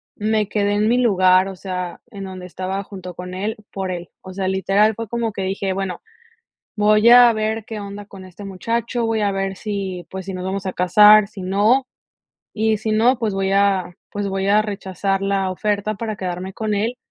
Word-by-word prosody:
me 215 -1 0
quedé 205 -1 +1
en 210 +2 +2
mi 245 - +3
lugar, 185 -5 +4
o 195 - -6
sea, 180 -1 -5
en 195 -1 -7
donde 185 -1 -8
estaba 185 +2 -4
junto 185 -3 -9
con 180 +1 -8
él, 205 +4 -3 0.2
por 190 -1 -4
él. 175 -1 -5
O 185 - -10
sea, 190 0 -2
literal 200 +3 +2
fue 230 -1 -5
como 230 0 -2
que 195 - -4
dije: 195 0 -2
"bueno, 195 -2 -4 0.8
voy 210 +1 +4
a 245 -1 +8
ver 220 0 -2
qué 215 -1 -6
onda 200 0 -8
con 195 -2 -12
este 185 +2 -11
muchacho", 230 +5 -2
voy 225 -1 0
a 205 -1 +1
ver 195 0 -2
si, 195 -4 -4
pues, 190 -1 -7
si 195 - -4
nos 185 0 -5
vamos 190 +1 -3
a 185 - -2
casar, 210 +4 +6
si 200 -2 -10
no, 210 +8 +2 0.7
y 220 0 +1
si 220 +1 -3
no, 230 +4 +4
pues, 225 -3 -1
voy 195 0 -1
a 195 -3 +2 0.2
pues, 205 -1 -3
voy 195 0 -1
a 210 +1 +5
rechazar 195 -1 -2
la 195 -1 0
oferta 210 +2 -1
para 215 0 -4
quedarme 185 +1 -4
con 215 0 -2
él, 225 +5 -1
200 Hz, 205 wpm, -20 LUFS, 190-215 Hz, 0.8 s, a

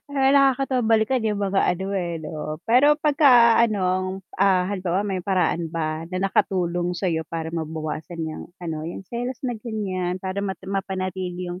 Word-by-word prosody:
Alam 285 - -3
mo 270 0 +4
nakakatawa 270 -2 +3
balikan 225 +2 +2
yung 210 -2 -1
mga 195 -1 +1
ano, 190 +2 0
eh, 170 -3 -2
'no? 155 0 -5
Pero 280 +6 +5
pagka 265 -6 +6
anong, 185 -3 0 0.2
ah, 185 -2 +3
halimbawa 185 -2 -1
may 190 -2 -2
paraan 180 -3 0
ba 155 -1 -2
na 185 - -2
nakatulong 175 -2 0
sa 190 - -2
iyo 160 -2 0
para 165 -1 -4
mabawasan 160 +1 -4
yang 155 0 -5 0.2
ano, 160 -2 -4
yung 175 +3 -6
selos 245 +3 -4
na 245 - -1
ganiyan, 190 -5 -3
para 190 +1 -3
mata 190 -1 -5
mapanatili 185 -2 -3
yung, 180 - -7
185 Hz, 170 wpm, -23 LUFS, 175-220 Hz, 0.2 s, pagka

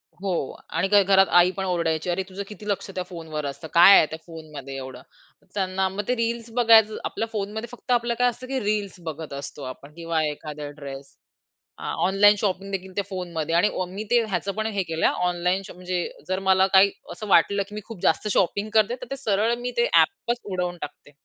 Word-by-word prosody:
हो, 195 0 -3 0.4
आणि 165 +4 0
काय 205 0 +5
घरात 195 0 +5
आईपण 185 +2 +3
ओरडायची. 170 -2 -1
"अरे 185 +2 0
तुझं 195 +2 -5
किती 210 0 -10
लक्ष 200 0 -2
त्या 185 - -2
फोनवर 160 -4 -6
असतं 140 +3 -6
काय 175 +4 +9
आहे - - +6
त्या 160 - -6
फोनमध्ये 150 -5 -9
एवढं." 130 -1 -8 0.5
त्यांना 190 -1 0
मग 195 +2 -3
ते 250 - +1
रील्स 230 0 -2
बघायचं 220 -2 +6
आपल्या 225 - -2
फोनमध्ये 215 +2 -4
फक्त 245 +1 -7
आपलं 240 -1 +2
काय 245 - +4
असतं, 245 +2 -8
की 265 0 -1
रील्स 205 -3 -1
बघत 160 -1 -6
असतो 140 +1 -7
आपण 140 +3 -9
किंवा 165 -1 -1
एखादा 150 0 -5
ड्रेस 135 -1 -9 0.6
अ, - - -11 0.2
ऑनलाईन 205 +2 +6
शॉपिंगदेखील 195 -1 -3
त्या 200 - -1
फोनमध्ये 170 -4 -3
आणि 175 +5 +4 0.2
मी 195 +4 -6
ते 240 0 +5
ह्याचं 195 -2 -2
पण 220 0 -2
हे 200 -2 0
केलं 165 -2 0
हा - - +3 0.2
ऑनलाईन 180 +2 0
शॉप - - -11
म्हणजे 180 -1 -2 0.2
जर 185 0 0
मला 190 0 +5
काही 195 +1 +7 0.2
असं 215 - -7
वाटलं, 200 +2 +4
की 210 - -11
मी 210 - -4
खूप 225 -6 -10
जास्त 210 - +2
शॉपिंग 200 +4 +1
करते 220 +2 +4
तर 250 - -5
ते 275 - -3
सरळ 220 -3 +1
मी 245 +1 -3
ते 475 - +3
ॲपच 245 -11 +2
उडवून 180 -2 -3
टाकते. 145 0 -8
190 Hz, 205 wpm, -24 LUFS, 165-210 Hz, 0.6 s, काय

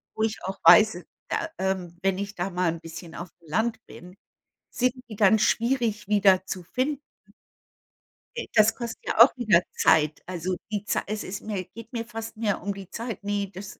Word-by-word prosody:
wo 220 - -1
ich 220 -1 -2
auch 190 +1 -5
weiß, 215 -4 +7 0.3
da, 330 - -1
ähm 185 -3 -2
wenn 195 -1 +1
ich 200 +1 -5
da 180 +2 -2
mal 180 -2 0
'n 165 - -9
bisschen 165 0 -9
auf'm 175 -1 -7
Land 220 +9 -1
bin, 180 +2 -13 0.6
sind 255 +1 +1 0.2
die 215 - -7
dann 210 +1 +5
schwierig 230 -2 +1
wieder 195 -3 +4
zu 185 - -5
finden. 265 - -2 1.4
De - - -4
das 220 0 +5
kostet 235 -2 -6
ja - - -1
auch 250 - +3
wieder 210 -8 +4 0.2
Zeit. 155 -1 +3
Also, 180 0 -3 0.2
die 205 -1 -2
Zei - - 0
es 215 +1 -3
ist 195 +1 -6
mir 205 -4 -4
geht 230 0 -12
mir 230 -1 -3
fast 225 -1 -7
mehr 215 -3 -1
um 200 +2 -2
die 195 -2 -10
Zeit. 230 -3 -6
Ne, 205 0 -1
das 190 +1 -9
205 Hz, 190 wpm, -26 LUFS, 185-225 Hz, 1.4 s, weiß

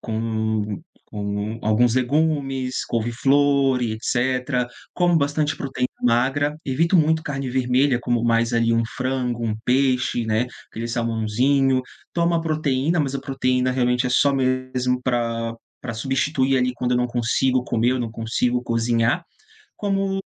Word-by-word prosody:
com 110 +1 -2 0.3
com 105 +2 -3
alguns 115 +3 +2
legumes, 135 -1 0
couve-flor 135 +3 +2
e 115 -2 -1
etecétera. 125 +2 0 0.3
Como 175 -1 +2
bastante 145 +1 0
proteína 130 -2 -3
magra. 135 +5 +1
Evito 165 +7 +2
muito 160 0 +3
carne 135 -4 -4
vermelha. 130 +1 +2
Como 120 -1 0
mais 115 0 +2
ali 115 0 +2
um 115 0 +2
frango, 125 -2 -2
um 110 - -1
peixe, 125 -2 +1
né, 110 +3 +1 0.2
aquele 115 +1 -5
salmãozinho. 120 +3 +1 0.3
Tomo 170 0 +2
a 165 - +2
proteína, 155 0 0
mas 140 -2 0
a 135 - -2
proteína 130 -1 0
realmente 125 0 +1
é - - -2
só 140 +2 +3
mesmo 130 -1 0
pra 115 -2 -1 0.3
pra 120 -2 -4
substituir 135 +3 0
ali 125 0 +1
quando 125 0 -1
eu - - +3
não 125 0 +1
consigo 125 +2 +1
comer, 120 +1 +1
eu 130 - 0
não 115 -2 -3
consigo 120 +2 -1
cozinhar. 115 +5 +1 0.5
Como 195 -1 -1
125 Hz, 145 wpm, -22 LUFS, 115-135 Hz, 0.5 s, muito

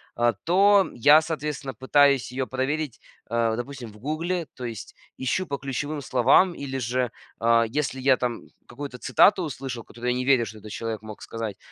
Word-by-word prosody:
а, 120 0 +2
то 195 +3 +5
я, 145 +6 +6
соответственно, 150 -4 -4
пытаюсь 135 0 +3
ее 130 +1 -2
проверить, 130 0 -2 0.3
э, 115 -1 +1
допустим, 120 -1 -6
в 105 - -16
Гугле. 165 +8 -2
То 130 - -9
есть 115 -3 -7 0.2
ищу 155 +8 -1
по 140 - -2
ключевым 145 +2 -4
словам 130 +8 +4
или 135 -4 -5
же, 125 0 -1 0.3
а, 115 0 +4
если 135 +2 -2
я 130 0 +4
там 120 -1 -2 0.3
какую-то 125 0 -8
цитату 200 +8 +4
услышал, 130 -5 -5
которую 120 +2 -4
я 125 - -1
не 125 - -2
верю, 130 -3 +4
что 110 -1 -9
этот 105 0 -11
человек 110 0 -4
мог 110 -1 -10
сказать, 110 -3 -5
130 Hz, 180 wpm, -25 LUFS, 115-145 Hz, 0.3 s, я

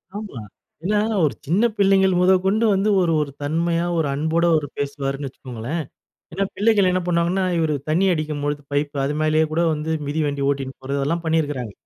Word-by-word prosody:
ஆமா, 205 - -6 0.4
ஏன்னா 205 +3 +1 0.3
ஒரு 145 - 0
சின்ன 185 +9 +2
பிள்ளைகள் 190 -2 +4
முதற்கொண்டு 190 +4 +3
வந்து 195 +2 +1
ஒரு, 170 -2 +2
ஒரு 140 -2 -3
தன்மையா 165 +3 0
ஒரு 155 - +1
அன்போடு 160 +4 +1
அவர் 155 -2 +2
பேசுவாருன்னு 140 0 -3
வச்சுக்கோங்களேன். 130 +5 -5 0.5
ஏன்னா 195 +3 0
பிள்ளைகள் 210 -3 +3
என்ன 185 - +1
பண்ணுவாங்கன்னா, 175 +2 +1
இவர் 160 -2 +1 0.2
தண்ணி 175 +5 +2
அடிக்கும்பொழுது 150 -2 -2
பைப்பு 145 0 -1
அது 145 - -1
மேலேயே 155 0 +3
கூட 170 +2 +1
வந்து 155 +1 -3 0.2
மிதி 150 +2 -1
வண்டி 140 -1 -2
ஓட்டின் 135 -1 -2
போறது 140 +2 -3
அதெல்லாம் 165 +5 -1
பண்ணியிருக்கிறாங்க. 145 -8 -1
160 Hz, 165 wpm, -22 LUFS, 145-180 Hz, 0.5 s, பிள்ளைகள்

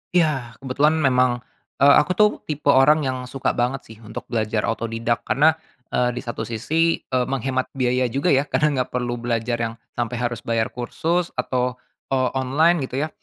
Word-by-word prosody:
Iya. 135 -9 +1
Kebetulan 145 +4 +2
memang, 125 -2 +2 0.4
eee, 140 - +8
aku 175 - 0
tuh 210 +1 +5 0.2
tipe 150 -1 +1
orang 150 +3 +5
yang 130 -1 -1
suka 135 0 -1
banget 125 +3 -1
sih 110 -1 -14
untuk 110 -1 -8
belajar 110 -2 0
otodidak, 115 +1 -2
karena, 145 +5 +5 0.4
eee, 125 -1 +1
di - - -4
satu 115 -2 -5
sisi, 160 +9 +1
eee, 130 -1 0
menghemat 130 0 -1
biaya 125 -1 +1
juga 140 +9 0
ya, 140 +1 +3
karena 150 - +2 0.2
nggak - - -19
perlu 120 -1 -2
belajar 120 0 -1
yang 115 -1 -2 0.2
sampai 120 0 -3
harus 120 -1 -2
bayar 115 0 0
kursus 165 +8 -1
atau, 125 0 -1 0.3
eee, 130 -1 +1
online 145 +3 +2
gitu 135 +3 -2
ya. 155 - -3
130 Hz, 175 wpm, -22 LUFS, 120-140 Hz, 0.4 s, eee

